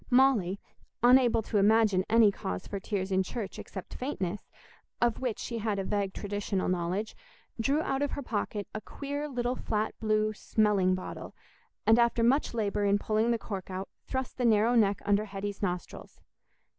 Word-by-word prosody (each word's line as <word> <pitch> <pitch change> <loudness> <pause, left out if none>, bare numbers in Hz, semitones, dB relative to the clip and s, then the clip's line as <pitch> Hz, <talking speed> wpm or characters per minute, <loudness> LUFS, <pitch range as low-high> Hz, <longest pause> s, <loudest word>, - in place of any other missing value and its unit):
Molly, 245 -8 +4 0.4
unable 245 -2 +5
to 210 -1 0
imagine 205 -2 +4
any 225 -2 +6
cause 90 - -5
for 200 - -5
tears 195 -1 -3
in 190 0 +3
church 200 +1 -5
except 190 - -8
faintness, 205 -8 -4 0.5
of 240 -1 +1
which 250 -4 -2
she 235 -1 -4
had 215 -2 -1
a 195 - -1
vague 200 0 -1
traditional 205 -1 -2
knowledge, 180 +4 -1 0.4
drew 280 +7 +1
out 270 +1 -1
of 285 - -1
her 285 - -4
pocket 210 -3 -3
a 215 - -4
queer 285 +6 -5
little 245 -1 -1
flat 215 -3 -2
blue 215 0 +1
smelling 205 -4 +2
bottle, 185 - -7 0.5
and 225 +2 +6
after 235 0 +3
much 255 +1 +2
labour 205 -2 0
in 200 0 +3
pulling 215 +2 +1
the 235 - +2
cork 195 -4 -6
out, 190 +1 -5 0.2
thrust 260 0 -4
the - - 0
narrow 225 +1 +4
neck 205 -4 +3
against 205 0 +3
Hetty's 200 0 -4
nostrils. 180 -3 -4
215 Hz, 170 wpm, -29 LUFS, 195-235 Hz, 0.5 s, any